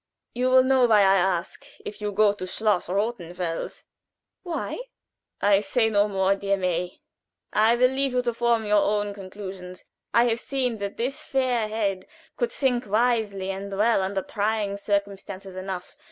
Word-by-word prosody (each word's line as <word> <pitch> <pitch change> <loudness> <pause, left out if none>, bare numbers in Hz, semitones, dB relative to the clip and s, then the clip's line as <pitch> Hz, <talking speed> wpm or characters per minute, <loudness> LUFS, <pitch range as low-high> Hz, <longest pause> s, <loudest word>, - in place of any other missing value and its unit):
"You 250 +1 0
will 255 0 +6
know 260 -1 +4
why 215 -3 +5
I 195 0 +5
ask 180 -2 -1 0.2
if 210 +1 -7
you 210 0 -2
go 205 0 +4
to 185 -2 -7
Schloss 210 -1 0
Rothenfels." 180 -5 -3 0.6
"Why?" 350 +4 -4 0.6
"I 200 -1 +4
say 225 +2 +1
no 205 0 +3
more, 195 -1 +1
dear 200 0 0
May. 180 -1 -2 0.5
I 220 +2 +4
will 250 +1 +4
leave 270 0 0
you 250 0 +1
to 240 -1 -1
form 235 -1 +1
your 210 0 +4
own 205 0 0
conclusions. 185 -2 -9 0.3
I 235 - +5
have 235 -1 +1
seen 250 -4 -2
that 200 0 -5
this 255 +4 -3
fair 255 -4 0
head 200 -4 -2 0.3
could 480 -1 -1
think 255 - 0
wisely 210 -3 +1
and 195 +1 -6
well 220 0 +3
under 190 0 -2
trying 210 -1 -1
circumstances 200 -1 -3
enough. 185 -1 -6
205 Hz, 165 wpm, -25 LUFS, 195-235 Hz, 0.6 s, will